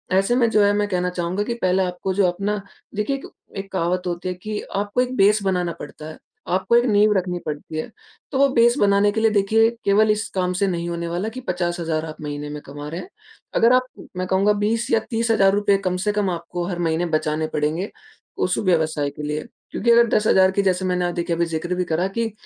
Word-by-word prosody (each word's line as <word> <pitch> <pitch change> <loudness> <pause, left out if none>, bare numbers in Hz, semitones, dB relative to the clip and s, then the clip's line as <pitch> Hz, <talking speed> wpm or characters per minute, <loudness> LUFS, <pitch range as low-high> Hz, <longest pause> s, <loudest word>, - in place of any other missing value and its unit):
ऐसे 195 +5 +3
में 240 -2 +3
जो 215 -2 +3
है 205 - +4
मैं 205 0 +1
कहना 180 -1 0
चाहूँगा 180 +2 -2
कि 235 - -2
पहले 185 +1 +2
आपको 180 +1 -3
जो 195 0 +3
अपना 200 +3 -2 0.3
देखिए 210 +7 0
एक 275 - -8 0.3
एक 195 0 -6
कहावत 180 0 0
होती 175 +1 -3
है - - -2
कि 210 +3 -5 0.2
आपको 205 +4 0
एक 250 0 -2
बेस 205 +2 +4
बनाना 180 -3 0
पडता 150 +1 -9
है, 155 - -10 0.3
आपको 190 +6 +1
एक 240 +1 +5
नींव 210 -1 +4
रखनी 180 -1 -2
पडती 150 +1 -5
है। 155 - -4 0.4
तो 265 - -1
वो 280 - +6
बेस 235 +2 +5
बनाने 200 0 +4
के 220 - -2
लिए 225 - +4
देखिए 215 +2 +3 0.2
केवल 215 +2 +4
इस 210 +1 -1
काम 180 -1 0
से 195 +2 +1
नहीं 170 -2 -2
होने 170 0 -3
वाला 175 +6 -2
कि 245 +3 -8
50,000 175 -3 -1
आप 155 -1 -9
महीने 145 0 -5
में 150 0 -6
कमा 145 +1 -8
रहे 165 +3 -5
हैं। - - -11 0.5
अगर 230 +2 +5
आप, 255 0 +4 0.3
मैं 185 - -2
कहूँगा 195 +3 +3
बीस 220 +4 -1
या 225 - +4
₹30,000 205 -3 +3
कम 180 0 0
से 210 - +2
कम 205 -2 0
आपको 175 0 -4
हर 180 -2 -4
महीने 165 0 0
बचाने 155 0 -2
पड़ेंगे 155 +6 -1 0.5
उस 180 - 0
व्यवसाय 160 -6 +1
के 145 +1 -9
लिए। 150 +1 -3 0.3
क्योंकि 235 - +1
अगर 235 0 +6
10,000 190 -3 +4
की 200 - +1
जैसे 185 -1 +1
मैंने 180 -1 0
देखिए 170 -1 -1
अभी 170 +1 +1
ज़िक्र 165 +2 -3
भी 180 - 0
करा 170 +3 0
कि 225 +3 -2
185 Hz, 225 wpm, -22 LUFS, 170-210 Hz, 0.5 s, वो